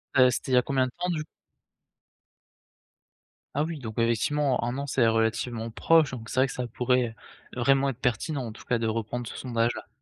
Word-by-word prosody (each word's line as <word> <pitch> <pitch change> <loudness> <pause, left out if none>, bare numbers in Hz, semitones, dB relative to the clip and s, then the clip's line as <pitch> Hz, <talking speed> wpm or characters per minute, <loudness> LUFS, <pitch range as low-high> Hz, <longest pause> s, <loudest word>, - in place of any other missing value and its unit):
Heu, 130 -1 +7
c'était 130 - -3
il - - +5
y - - +6
a - - +6
combien 135 0 +1
de 130 - -6
temps 180 +1 -2
du 160 -3 -1 2.3
Ah 145 - +1
oui, 160 -1 -4
donc 110 -4 -7
effectivement, 125 +4 +1
un 120 +2 -2
an, 140 - -3
c'est 130 -4 +3
relativement 115 +1 0
proche, 160 +4 +4
donc 115 -3 -7
c'est - - -1
vrai 135 - +4
que - - -6
ça 125 -1 -3
pourrait 125 -1 0 0.4
vraiment 135 +2 +3
être 130 -2 -6
pertinent, 130 +3 -1
en 115 - -5
tout 110 - -13
cas, 125 - +1
de 115 -1 -1
reprendre 115 +2 -2
ce - - -7
sondage-là. 120 -2 -1
125 Hz, 205 wpm, -27 LUFS, 115-135 Hz, 2.3 s, Heu